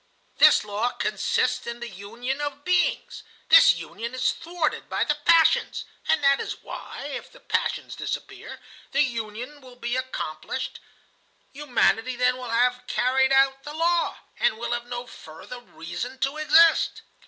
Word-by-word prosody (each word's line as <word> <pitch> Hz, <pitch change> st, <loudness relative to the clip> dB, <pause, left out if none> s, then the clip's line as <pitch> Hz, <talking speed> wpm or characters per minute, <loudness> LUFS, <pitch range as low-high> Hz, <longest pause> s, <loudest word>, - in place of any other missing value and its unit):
This -, -, +7 dB
law 210 Hz, +4 st, -1 dB
consists 250 Hz, +4 st, -1 dB
in 235 Hz, 0 st, -5 dB
the 240 Hz, -, -6 dB
union 235 Hz, +7 st, -5 dB
of 285 Hz, -1 st, -4 dB
beings. 360 Hz, 0 st, 0 dB, 0.3 s
This -, -, +8 dB
union 235 Hz, +3 st, -7 dB
is 255 Hz, 0 st, +2 dB
thwarted 335 Hz, -2 st, -3 dB
by -, -, 0 dB
the -, -, +1 dB
passions. 330 Hz, -2 st, +3 dB, 0.2 s
And 315 Hz, -2 st, +2 dB
that 275 Hz, 0 st, +4 dB
is -, -, -6 dB
why, -, -, -7 dB
if -, -, -7 dB
the -, -, -17 dB
passions -, -, -2 dB
disappear, -, -, -6 dB, 0.3 s
the 285 Hz, -, +4 dB
union 240 Hz, +3 st, -5 dB
will 255 Hz, -1 st, -14 dB
be 240 Hz, 0 st, -3 dB
accomplished. 260 Hz, -3 st, -4 dB, 0.7 s
Humanity 255 Hz, -3 st, +1 dB
then 250 Hz, +1 st, +2 dB
will 250 Hz, -1 st, -7 dB
have 250 Hz, +2 st, +1 dB
carried 265 Hz, +2 st, +2 dB
out 270 Hz, 0 st, +3 dB
the 295 Hz, +2 st, -8 dB
law, 340 Hz, +1 st, +1 dB, 0.2 s
and 220 Hz, -, +2 dB
will 235 Hz, +1 st, -4 dB
have 240 Hz, 0 st, -2 dB
no 245 Hz, 0 st, -5 dB
further 225 Hz, +3 st, -11 dB
reason 245 Hz, +4 st, -7 dB
to 275 Hz, +2 st, 0 dB
exist." 325 Hz, +2 st, +4 dB
250 Hz, 155 wpm, -25 LUFS, 235-285 Hz, 0.7 s, This